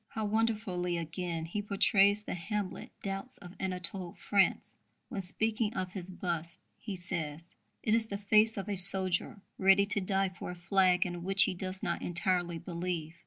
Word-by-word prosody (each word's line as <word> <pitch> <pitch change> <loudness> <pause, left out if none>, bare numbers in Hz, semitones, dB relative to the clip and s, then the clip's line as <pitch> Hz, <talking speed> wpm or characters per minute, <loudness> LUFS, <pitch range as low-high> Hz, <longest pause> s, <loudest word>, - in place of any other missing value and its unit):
How 220 -2 -4
wonderfully, 210 -5 -1
again, 165 0 -4
he 190 +5 -3
portrays 200 0 +3
the - - -5
Hamlet 200 +2 -4
doubts 195 +6 -5
of 180 0 -12
Anatole 185 -1 -1
France, 200 -2 +1 0.3
when, 215 -6 -3
speaking 215 +4 0
of 185 -1 -3
his 185 -1 -6
bust, 170 -2 -4 0.2
he 205 -3 -6
says: 165 -3 -2 0.4
"It 215 - +1
is 225 -1 +3
the 200 - -4
face 215 +2 +3
of 195 - -4
a 205 - -2
soldier 185 +1 +4 0.2
ready 195 +1 +5
to 200 0 -1
die 195 0 0
for 180 -1 -8
a 180 - -6
flag 180 0 +2
in 175 -1 -5
which 195 +2 +6
he - - 0
does 185 +1 -5
not 170 - -2
entirely 175 -1 -1
believe." 170 -2 -4
190 Hz, 170 wpm, -31 LUFS, 175-205 Hz, 0.4 s, which